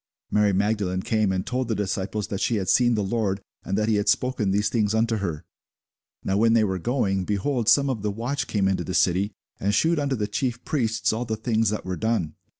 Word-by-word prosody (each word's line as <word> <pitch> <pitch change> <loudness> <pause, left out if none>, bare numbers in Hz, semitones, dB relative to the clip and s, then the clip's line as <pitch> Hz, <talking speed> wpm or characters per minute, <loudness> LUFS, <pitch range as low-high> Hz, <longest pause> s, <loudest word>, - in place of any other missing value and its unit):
Mary 105 -1 +3
Magdalene 100 -2 0
came 110 -3 +1
and 95 0 -2
told 130 0 -2
the 115 - -1
disciples 100 +1 -2
that 100 - -3
she 120 - +1
had 95 -3 -2
seen 120 +3 +4
the 105 - 0
Lord, 100 -1 -1 0.2
and 95 - -2
that 110 0 +1
he 110 -2 +2
had 105 0 +1
spoken 125 -4 +1
these 105 +2 +1
things 110 -1 +1
unto 115 0 +1
her. 85 -7 -4 0.8
Now 95 - 0
when 115 +2 +4
they 115 -1 +4
were 95 -3 -1
going, 100 -4 0
behold, 110 +5 0
some 140 +4 +5
of 130 -6 -2
the 105 - -1
watch 120 +7 -3
came 100 -3 +1
into 95 -1 0
the 95 - -4
city, 95 +3 +2 0.3
and 100 +1 +1
shewed 165 +5 +2
unto 140 -2 0
the 105 -3 -1
chief 120 +3 -3
priests 115 -7 0
all 115 +3 -2
the 110 -1 -3
things 110 -1 +1
that 105 - -3
were 90 -1 -3
done. 110 -9 -1
105 Hz, 230 wpm, -25 LUFS, 100-115 Hz, 0.8 s, some